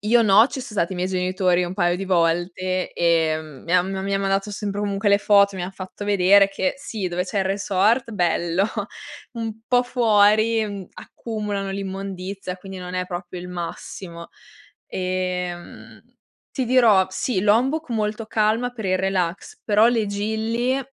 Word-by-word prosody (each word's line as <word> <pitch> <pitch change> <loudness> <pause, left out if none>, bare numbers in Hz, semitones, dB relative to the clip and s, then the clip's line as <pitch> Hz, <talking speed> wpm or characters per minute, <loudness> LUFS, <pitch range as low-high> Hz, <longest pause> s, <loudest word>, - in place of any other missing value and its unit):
Io 230 +3 +4
no, 215 +3 +6
ci 275 -2 -6
son 245 -4 -9
stati 175 0 0
i - - -5
miei 180 +1 -1
genitori 180 -1 +1
un 180 +1 -5
paio 175 -2 +1
di 195 - -4
volte, 180 +1 0
ehm, 160 -4 0
mi 170 - -4
han 180 +1 +3
m 195 - -3
mi 195 +1 -3
han 195 - 0
mandato 195 +1 0
sempre 205 0 -4
comunque 205 0 0
le 200 0 +5
foto, 200 -1 +4
mi 180 - -4
han 185 +2 -5
fatto 190 +2 -8
vedere 200 0 +5
che 270 +8 -1
sì, 215 -8 -4
dove 180 +1 -2
c'è 200 - -3
il 190 - +1
resort 200 +5 +1
bello, 175 -1 +1 0.7
un 225 -2 -5
po' 245 0 +3
fuori, 220 -2 +3
mhmm, 200 -3 -7
accumulano 210 -3 -5
l'immondizia 195 -1 -5
quindi 190 0 -9
non 180 0 -7
è 180 0 -1
proprio 175 0 -6
il 180 +1 -8
massimo. 170 0 -7 0.6
Ehm, 180 -1 -4 0.5
ti 260 - -1
dirò 230 -6 +5
sì, 190 +1 -1
Lombok 250 +9 +2
molto 215 0 -2
calma 220 +3 +1
per 225 -4 -8
il 185 0 +1
relax, 190 - -2
però 215 +1 +4
le 230 -3 +1
Gili 220 +5 -1
195 Hz, 170 wpm, -22 LUFS, 180-215 Hz, 0.7 s, no